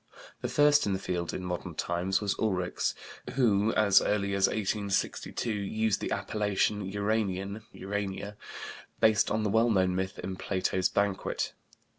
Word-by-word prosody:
The - - -2
first 145 -3 +4
in 100 - +1
the - - +1
field 85 -3 -2
in 95 - -5
modern 90 -1 -4
times 90 +3 0
was 100 -2 +1
Ulrichs 90 -5 0 0.4
who, 110 -4 +3
as 105 -3 +6
early 100 -1 0
as 100 -1 +4
1862, 105 +2 -1
used 110 +1 0
the - - -2
appellation 105 0 0
"Uranian" 100 0 -1
(Uranier), 100 +1 -4 0.6
based 110 -1 +4
on 110 - 0
the 105 - 0
well 115 +2 +4
known 95 -4 +3
myth 95 +2 -2
in 95 0 -5
Plato's 95 -1 0
Banquet. 100 -1 -1
100 Hz, 145 wpm, -29 LUFS, 95-110 Hz, 0.6 s, as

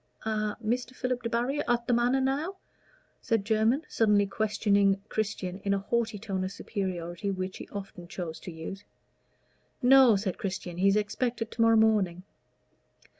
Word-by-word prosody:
"A 215 -1 -1
Mr. 245 +2 -1
Philip 250 0 -2
Debarry 240 +5 0
at 240 -1 +1
the 245 - +1
Manor 245 +3 +3
now?" 285 +8 -1 0.7
said 225 -4 0
Jermyn, 220 +7 +2
suddenly 210 -2 +3
questioning 200 -1 +2
Christian, 200 -4 -3
in 200 0 0
a - - +1
haughty 225 +2 -1
tone 195 -3 -3
of 185 - -3
superiority 185 -2 -4
which 185 -1 -3
he - - -9
often 195 -3 -8
chose 170 -2 -6
to 180 - -8
use. 165 +5 -7 1.0
"No," 260 -3 +7
said 195 -2 -2
Christian, 185 -3 -4
"he 190 +2 +3
is 195 - +4
expected 225 +2 -1
to 230 - -3
morrow 225 0 +6
morning." 205 -5 +2
210 Hz, 155 wpm, -28 LUFS, 195-235 Hz, 1.0 s, No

